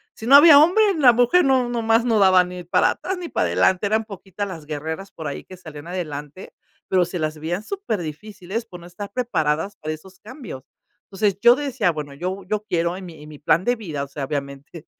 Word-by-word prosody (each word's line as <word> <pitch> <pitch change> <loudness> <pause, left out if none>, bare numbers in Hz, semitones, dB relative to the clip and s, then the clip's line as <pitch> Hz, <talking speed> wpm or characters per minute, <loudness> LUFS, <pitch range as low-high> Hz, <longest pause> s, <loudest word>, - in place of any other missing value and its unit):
si 220 - -8
no 275 - +8
había 290 0 +9
hombre, 355 +8 +5
la 260 -5 +6
mujer 245 +9 +3
no 260 -2 +2
nomás 230 -1 +1
no 225 -3 +2
daban 185 -2 +5
ni 180 0 -8
para 175 - +2
atrás 380 0 -4
ni 345 -2 -6
para - - 0
adelante, 190 +2 +2
eran 220 +2 +1
poquitas 200 -1 -7
las 165 -5 -9
guerreras 160 +6 -6
por 160 -5 -7
ahí 140 - -6
que 185 - -12
salían 155 -3 -11
adelante, 155 -2 -7 0.4
pero 180 -2 +3
se 180 +1 -6
las 155 0 -3
veían 175 +6 -3
superdifíciles 210 - -5
por 180 -6 -11
no - - -13
estar 200 +3 -9
preparadas 185 -6 -1
para 155 0 -4
esos 185 +4 -13
cambios. 215 - -10 0.5
Entonces, 195 0 0
yo 240 +1 +7
decía: 265 -9 -1
"Bueno, 150 -3 -7
yo 185 +6 -4
yo 210 +2 -2
quiero 170 -1 -1
en 190 - -9
mi 160 -3 -12
en 150 - -12
mi 150 - -11
plan 165 +3 +2
de 245 - +2
vida", 160 -10 -5
o - - -7
sea, 140 0 -5
obviamente, 140 +2 -7
185 Hz, 215 wpm, -22 LUFS, 160-225 Hz, 0.5 s, había